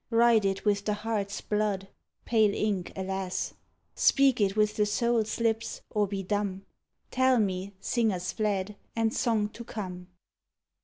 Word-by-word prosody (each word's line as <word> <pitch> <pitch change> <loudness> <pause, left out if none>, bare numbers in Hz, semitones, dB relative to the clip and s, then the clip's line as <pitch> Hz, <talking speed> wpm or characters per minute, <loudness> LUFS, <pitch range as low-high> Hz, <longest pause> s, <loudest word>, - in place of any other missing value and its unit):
Write 230 -2 +4
it 195 +1 -1
with 205 -1 +2
the 210 - +1
heart's 210 -2 -3
blood? 210 -2 -1 0.4
(Pale 215 -3 +3
ink, 200 -4 -1
alas!) 190 -1 -3 0.4
Speak 270 -4 +4
it 195 -1 +2
with 210 0 +2
the 210 -1 +2
soul's 230 +1 0
lips, 225 0 -1
Or 210 -1 +1
be 195 0 -3
dumb? 200 0 -2 0.5
Tell 260 0 +4
me, 195 -2 -1
singers 195 -6 0
fled, 205 -2 -1 0.2
and 225 -1 +1
Song 225 -4 +1
to 235 - -9
come! 185 -6 -6
210 Hz, 145 wpm, -28 LUFS, 195-225 Hz, 0.5 s, Write